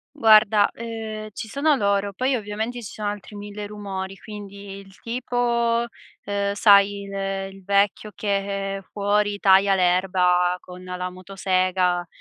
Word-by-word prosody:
Guarda, 215 -2 +6
ehm, 220 -2 -6
ci 220 - -7
sono 285 +6 +2
loro, 200 -3 0
poi 255 +5 0
ovviamente 220 +3 -4
ci 210 - -8
sono 210 -1 -3
altri 205 0 -6
mille 205 0 -7
rumori, 195 -2 -6
quindi: 200 -2 -9
il 195 0 -15
tipo 235 -1 0
uhm, 200 -3 -5
sai 200 -1 +5
il, 200 0 -8
ehm, 195 0 -3
il 195 -1 -15
vecchio 200 +1 +1
che 195 -1 -2
fuori 205 0 +1
taglia 195 0 +5
l'erba 180 -1 +2
con 180 0 -12
la 180 0 -4
motosega, 185 -1 0
200 Hz, 140 wpm, -23 LUFS, 195-215 Hz, -, Guarda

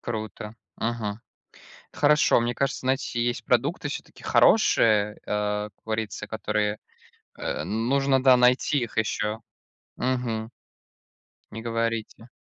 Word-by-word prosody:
Круто. 110 -2 -5 0.2
Мгм. 115 -2 -3 0.7
Это - - -14
хорошо. 150 -2 +5
Мне 120 +1 -1
кажется, 135 0 -1
знаете, 130 -2 -1
есть 120 -1 -2
продукты 130 +7 +1
всё-таки - - -8
хорошие, 105 - +4
а, 105 0 -1
как 100 - -42
говорится, 110 -2 -3
которые, 105 -1 -1 0.6
э, 75 - -3
нужно, 130 - +1
да, 130 -1 +6
найти 125 +4 +3
их 115 -3 -5
ещё. 110 0 -1 0.6
Мгм. 120 -3 -2 1.0
Не 115 +1 -7
говорите. 115 0 -3
115 Hz, 115 wpm, -25 LUFS, 105-125 Hz, 1.0 s, да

